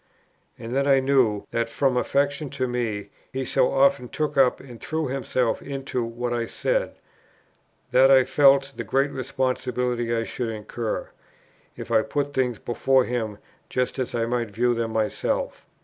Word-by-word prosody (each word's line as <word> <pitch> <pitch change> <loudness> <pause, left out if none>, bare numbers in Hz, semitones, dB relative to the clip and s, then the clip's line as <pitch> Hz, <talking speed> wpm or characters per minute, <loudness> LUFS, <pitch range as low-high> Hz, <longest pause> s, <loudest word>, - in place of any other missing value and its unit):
And 115 +3 -6
then 140 +1 +1
I 135 -1 +5
knew, 130 -6 +2
that, 115 0 -1
from 135 +2 +1
affection 140 +3 0
to 130 -1 0
me, 110 -5 -3 0.2
he 130 0 -3
so 130 0 +2
often 135 -2 +3
took 150 -1 -2
up 135 -2 +4
and 125 -4 -12
threw 160 0 -2
himself 130 -2 -1
into 135 -3 -3
what 120 +1 -3
I 120 -1 -1
said, - - -1 1.0
that 130 +1 +6
I 135 -1 +7
felt 135 +1 +4
the - - -4
great 135 +1 +1
responsibility 125 -2 -1
I 115 -1 +1
should 120 +1 -4
incur, 110 +1 -4 0.7
if - - -7
I 110 -1 +5
put 145 +4 -2
things 125 -4 0
before 130 +2 +2
him 110 -4 -3 0.3
just 125 +1 -1
as 125 -1 -2
I 115 -1 +1
might 120 -1 -1
view 120 +4 +1
them 115 -1 -2
myself. 110 -1 -2
125 Hz, 165 wpm, -24 LUFS, 115-135 Hz, 1.0 s, I